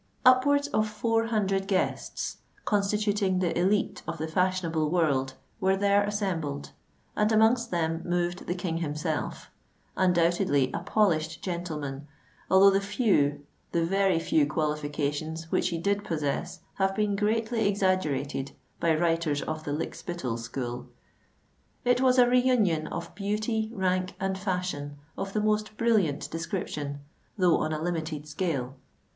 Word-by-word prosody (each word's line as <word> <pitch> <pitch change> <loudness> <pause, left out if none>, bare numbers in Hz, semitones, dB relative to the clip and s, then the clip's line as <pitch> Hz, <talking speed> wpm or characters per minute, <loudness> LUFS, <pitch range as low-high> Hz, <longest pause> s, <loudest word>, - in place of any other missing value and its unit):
Upwards 285 +3 +5
of 215 -5 +1
four 225 +1 0
hundred 195 -4 0
guests—constituting 200 +1 -1
the 180 -2 +1
élite 195 +4 +1
of - - -3
the 160 - -3
fashionable 170 -2 0
world—were 160 +4 0
there 200 0 +3
assembled; 180 -9 -2 0.4
and 210 +1 +2
amongst 225 +2 +4
them 165 -1 -1
moved 175 0 -1
the 175 - -1
King 175 -2 -2
himself—undoubtedly 165 0 -1
a - - -1
polished 165 -7 +1
gentleman, 150 -6 -4 0.4
although 195 +1 +7
the 195 +1 +2
few—the 170 - 0
very 195 0 +2
few 155 -2 +2
qualifications 150 +1 -2
which - - +2
he 170 - -2
did 200 +4 0
possess 150 -8 -2 0.2
have 195 0 +2
been 210 -1 +1
greatly 220 +1 +1
exaggerated 155 -9 0 0.3
by 165 -1 +3
writers 165 -3 +1
of 155 0 -4
the 145 - -3
Lykspittal 150 -4 -3
school. 120 +1 -5 1.0
It 245 0 +3
was 260 -1 +4
a 245 -1 +7
re 250 +1 +5
union 210 -12 +2
of 170 - -6
beauty, 215 +2 -1
rank, 185 -3 -1
and 195 0 -1
fashion, 180 -7 -3 0.2
of 195 0 -5
the 215 - +1
most 215 0 0
brilliant 205 -11 +1
description, 160 -4 -4 0.4
though 180 -4 +4
on 155 - -1
a 155 - -2
limited 160 -3 -3
scale. 145 -5 -2
180 Hz, 130 wpm, -28 LUFS, 155-205 Hz, 1.0 s, although